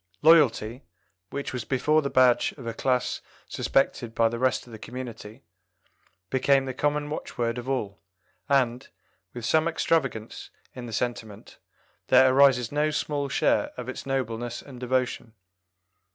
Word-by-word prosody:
Loyalty, 130 -7 +4 0.5
which 140 -1 -5
was 125 -3 -3
before 150 +6 +2
the 140 - -2
badge 130 -2 +3
of 130 - -12
a 115 - -3
class 125 +1 -1 0.3
suspected 120 -4 0
by 115 -1 +3
the 115 +1 -5
rest 130 +1 +1
of 120 - -15
the 110 - -9
community, 115 -3 -8 0.9
became 135 +1 +3
the 130 - -4
common 145 +2 -1
watchword 120 -5 -3
of 125 +2 -7
all, 105 -7 -2 0.5
and, 125 -2 +1 0.5
with 120 -2 -5
some 160 +5 +3
extravagance 135 -9 -1 0.2
in 125 -1 -8
the - - -8
sentiment, 110 -2 -5 0.5
there 130 0 +6
arises 130 -4 +4
no 150 +1 +1
small 145 -1 -2
share - - +2
of 125 -1 -6
its 130 - -6
nobleness 120 -3 -2
and 130 -3 -11
devotion. 125 -2 -2
130 Hz, 145 wpm, -26 LUFS, 115-140 Hz, 0.9 s, there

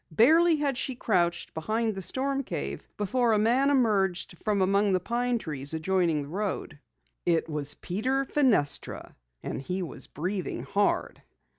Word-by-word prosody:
Barely 320 - +5
had 280 -4 -1
she 260 - -2
crouched 175 -7 0
behind 220 +7 -1
the 195 - -6
storm 270 +7 -1
cave 70 - -5
before 235 +3 +1
a - - +3
man 245 +6 +3
emerged 200 -9 +1
from 205 -3 +1
among 200 +1 +2
the 185 - +3
pine 240 +5 -1
trees 150 -6 -1
adjoining 165 -2 +1
the - - -9
road. 190 -3 -4 0.4
It 170 -2 +1
was 150 -2 -2
Peter 255 +9 -1
Fenestra 245 - +2 0.3
and - - -4
he 180 +6 -3
was 170 - -5
breathing 180 -6 -4
hard. 200 +9 0
200 Hz, 150 wpm, -27 LUFS, 170-245 Hz, 0.4 s, Barely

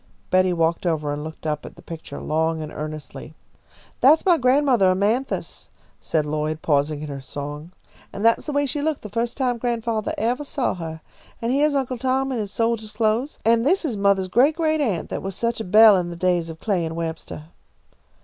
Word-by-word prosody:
Betty 185 0 +4
walked 165 +1 0
over 150 -3 0
and 145 +1 -5
looked 160 0 -9
up 150 -1 -2
at - - -10
the - - -16
picture 165 -1 -8
long 160 +1 0
and 150 - -7
earnestly. 155 0 -7 0.6
"That's 300 +7 +5
my 360 -2 +6
grandmothah, 255 -5 +3
Amanthis," 205 +8 -1 0.3
said 155 -2 -1
Lloyd, 155 +1 -2
pausing 145 0 +1
in - - -5
her 140 -1 -6
song, 145 +4 -7 0.4
"and 205 - -4
that's 230 +6 +3
the - - -1
way 285 0 +1
she 285 +2 -2
looked 310 -1 -1
the 210 - -7
first 230 +2 -2
time 250 -3 0
grandfathah 230 -2 -1
evah 245 +6 0
saw 275 -3 -1
her. 160 -2 -7 0.4
And 235 +2 -1
heah's 290 +1 +2
Uncle 255 -3 -1
Tom 265 +1 0
in 250 - -2
his 205 -2 -4
soldier 230 0 0
clothes, 220 +6 -1
and 230 0 +4
this 345 +6 +2
is 255 -8 -1
mothah's 200 -2 +2
great 260 +11 +3
great 315 -2 +1
aunt 210 - -1
that - - -3
was 195 -1 -5
such 235 +1 -1
a - - -3
belle 215 +2 +7
in 175 -1 -2
the 170 - -6
days 175 -1 0
of 160 0 -9
Clay 195 -4 0
and 160 0 -4
Webstah." 160 -1 -6
210 Hz, 205 wpm, -23 LUFS, 160-250 Hz, 0.6 s, belle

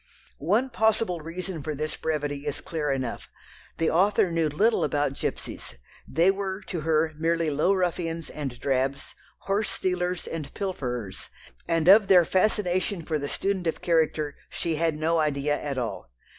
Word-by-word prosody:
One 215 - +1
possible 220 -5 +2
reason 170 +1 -5
for 150 +1 -3
this 155 +2 -2
brevity 145 -2 -2
is 145 - -2
clear 155 -3 -3
enough. 130 -3 -3 0.5
The 165 - +1
author 190 +1 +3
knew 165 -2 +1
little 200 +5 +2
about 145 -2 +1
gipsies, 100 - -5 0.3
they 170 +4 +4
were 195 0 -3
to 185 -3 -5
her 155 0 +2
merely 165 -1 +1
low 150 +6 +2
ruffians 170 -3 -1
and 135 -5 -5
drabs, 135 0 -1 0.3
horse 200 +1 0
stealers 180 -2 -1
and 155 -4 -5
pilferers, 125 - -4 0.4
and 165 -1 +1
of 200 +1 +8
their 180 -3 +7
fascination 185 -1 +1
for 155 -2 -1
the 145 0 -3
student 195 -3 -1
of 165 - -1
character 160 -3 +1
she 165 - -2
had 165 -1 +1
no 165 +2 +1
idea 145 -1 +1
at 140 -2 -3
all. 120 - -4
165 Hz, 155 wpm, -26 LUFS, 150-185 Hz, 0.5 s, of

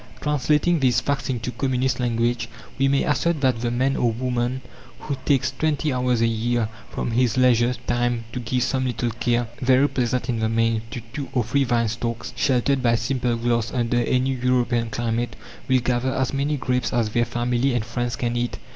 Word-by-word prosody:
Translating 150 +3 +2
these 125 -3 +3
facts 140 0 -2
into 125 -1 -2
communist 130 -1 0
language, 120 -1 0 0.3
we 135 - +4
may 140 0 +2
assert 155 +2 +1
that 130 -4 +2
the 120 - 0
man 130 +3 +1
or 120 - +2
woman 125 +2 -2 0.4
who 140 - -3
takes 140 -4 +2
twenty 155 -2 0
hours 125 -2 +1
a - - +4
year 115 0 0 0.2
from - - -3
his 125 +1 +1
leisure 125 -1 +4
time 120 -1 0
to - - -3
give 125 +1 -1
some 130 0 0
little 120 -1 -1
care 120 +1 0
very 130 +3 +4
pleasant 125 -2 -1
in 120 -3 -1
the 110 0 +1
main 115 0 +1
to 115 +2 -6
two 140 -2 -5
or 125 -3 +2
three 135 +5 +1
vine 120 -1 +1
stalks 115 +1 -4
sheltered 130 0 +2
by 120 -2 +3
simple 120 0 0
glass 115 -1 0
under 120 -1 0
any 125 +2 +1
European 125 -2 +1
climate, 120 +1 -2 0.3
will 130 0 +4
gather 125 +1 0
as 130 0 0
many 140 +2 0
grapes 125 -1 -1
as 115 -3 +1
their 120 +1 +2
family 120 +2 0
and 115 -3 -1
friends 120 +1 -2
can 120 -1 -2
eat. 120 0 -2
120 Hz, 190 wpm, -23 LUFS, 120-130 Hz, 0.4 s, we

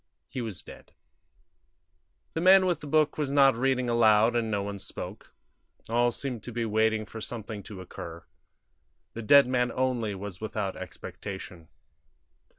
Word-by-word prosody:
He 130 - -5
was 110 -6 -5
dead. - - -14 1.4
The 160 - -2
man 190 +1 +7
with 175 -4 +1
the 150 - -9
book 155 +1 +2
was 145 -2 -1
not 140 -1 +6
reading 130 0 +1
aloud, 115 -1 +4
and 115 -2 0
no 100 -2 -1
one 100 0 -5
spoke; - - -5 0.6
all 120 +1 +3
seemed 120 -1 -4
to 120 - -7
be 115 0 -2
waiting 110 0 +1
for 110 +1 -9
something 110 -2 -6
to 100 -1 -9
occur; 85 -2 -9 0.9
the 115 - -6
dead 140 +6 +7
man 125 -1 +1
only 120 -5 -1
was 95 -1 -7
without 105 -3 -3
expectation. 90 -4 -8
115 Hz, 155 wpm, -28 LUFS, 105-130 Hz, 1.4 s, man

